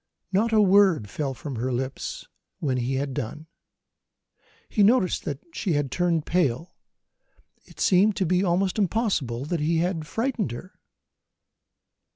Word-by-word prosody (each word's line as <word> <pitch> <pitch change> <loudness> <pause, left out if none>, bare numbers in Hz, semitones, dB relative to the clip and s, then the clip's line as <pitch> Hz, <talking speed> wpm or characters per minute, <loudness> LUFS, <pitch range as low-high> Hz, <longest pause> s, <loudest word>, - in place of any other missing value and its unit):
Not 215 +4 +2
a 215 -1 +5
word 190 - +4
fell 140 -3 -3
from 140 -2 -6
her 125 +3 -1
lips 130 +2 -4 0.3
when 135 -4 -1
he 125 +2 -1
had 135 0 -2
done. 145 +4 -5 1.2
He 215 - 0
noticed 205 -3 +3
that 145 - -3 0.2
she 185 -2 -1
had 145 -3 0
turned 170 -3 0
pale: 165 -1 0 0.9
it - - -18
seemed 195 +2 +4
to 190 - 0
be 180 +2 +2
almost 185 +2 +1
possible 140 - -1
that 170 +2 -2
he 160 +3 +1
had 165 -2 -1
frightened 225 - -1
her! 185 +11 -9
165 Hz, 145 wpm, -25 LUFS, 135-195 Hz, 1.2 s, a